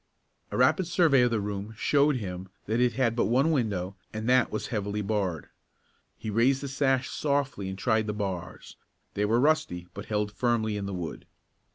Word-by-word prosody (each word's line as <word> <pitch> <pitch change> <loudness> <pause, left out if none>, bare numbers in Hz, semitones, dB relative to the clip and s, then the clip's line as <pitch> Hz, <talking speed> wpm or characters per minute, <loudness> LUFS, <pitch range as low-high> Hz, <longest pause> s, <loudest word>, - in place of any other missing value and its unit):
A - - -4
rapid 185 -3 +3
survey 165 -6 +4
of 125 - +4
the 115 -2 0
room 100 +1 -4
showed 145 +3 +3
him 95 -5 -5 0.2
that 110 +3 0
it 125 -1 +3
had 115 -2 +1
but 120 - +2
one 135 +7 +3
window 100 - -1 0.2
and 110 +1 -4
that 130 0 +4
was 110 - -3
heavily 105 -1 -2
barred. 95 -7 -2 0.7
He 110 - -5
raised 125 +5 +3
the 140 - -4
sash 135 -1 +1
softly 135 -9 -1
and 95 - -5
tried 110 +1 +1
the 105 - -1
bars. 95 -5 -5 0.4
They 105 - 0
were 115 +3 +2
rusty 125 - +1
but 100 - -7
held 105 -1 -1
firmly 110 0 0
in 100 -1 -3
the 100 - -4
wood. 85 -3 -6
110 Hz, 190 wpm, -28 LUFS, 100-130 Hz, 0.7 s, survey